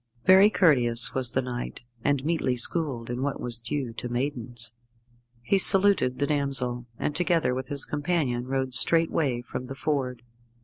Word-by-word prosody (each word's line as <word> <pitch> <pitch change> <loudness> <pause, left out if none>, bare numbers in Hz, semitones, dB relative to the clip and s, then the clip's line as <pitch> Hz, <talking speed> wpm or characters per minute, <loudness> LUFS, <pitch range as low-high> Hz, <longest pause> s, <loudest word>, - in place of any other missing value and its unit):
Very 190 +2 +6
courteous 125 - +2
was 130 -2 +2
the 130 - 0
knight, 120 -1 -7 0.2
and 140 -1 -1
meetly 160 -6 -1
schooled 125 -2 -1
in 120 +1 -4
what 140 0 -3
was 120 -2 -2
due 120 +1 -5
to 125 +2 -7
maidens. 120 -3 -4 0.7
He 195 +9 +1
saluted 195 -10 +6
the 145 - -1
damsel, 135 -4 -2
and, 145 - -3
together 170 -6 0
with 130 0 -5
his 140 -1 0
companion, 145 -5 -2
rode 130 -1 -3
straightway 140 -1 +1
from 125 +1 -7
the 135 - -7
ford. 130 -4 -3
130 Hz, 160 wpm, -25 LUFS, 120-150 Hz, 0.7 s, Very